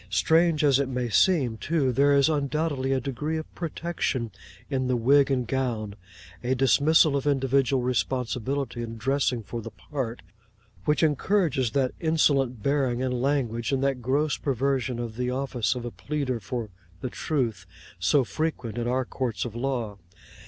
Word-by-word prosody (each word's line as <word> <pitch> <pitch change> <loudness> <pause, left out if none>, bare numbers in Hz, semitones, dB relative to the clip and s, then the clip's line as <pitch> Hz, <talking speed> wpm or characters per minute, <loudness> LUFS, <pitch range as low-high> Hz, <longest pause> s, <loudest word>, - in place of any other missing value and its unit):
Strange 165 -1 +3
as 140 -2 +4
it 140 -2 0
may 125 -2 -2
seem 130 - +3
too, 145 -1 0
there 140 +4 +3
is 140 +1 +5
undoubtedly 145 -2 0
a 135 - +2
degree 140 +5 -3
of 155 - -7
protection 160 -8 -2 0.4
in 130 -2 -1
the 125 - +1
wig 140 +4 +4
and 130 -3 +1
gown—a 110 -3 -4
dismissal 145 +4 +4
of 140 +1 -1
individual 135 -1 +2
responsibility 125 +1 -1
in 115 -1 -6
dressing 130 0 0
for 115 +3 -5
the - - -7
part—which 115 - -5
encourages 155 - +2
that 135 -2 +1
insolent 140 - +2
bearing 135 -3 +1
and 125 -1 -1
language, 125 -4 0
and 135 -1 0
that 135 -2 0
gross 145 +5 +1
perversion 130 -2 -1
of 115 -2 -5
the 125 0 -1
office 125 -5 -1
of 120 -1 -5
a 120 - -4
pleader 140 -4 -3
for 110 +1 -5 0.3
The 130 - -4
Truth, 115 - -2 0.3
so 95 +10 +3
frequent 120 -4 -3
in 120 - -2
our 130 +1 0
courts 125 -3 -3
of 120 - -5
law. 120 -5 -2
130 Hz, 155 wpm, -26 LUFS, 120-140 Hz, 0.4 s, is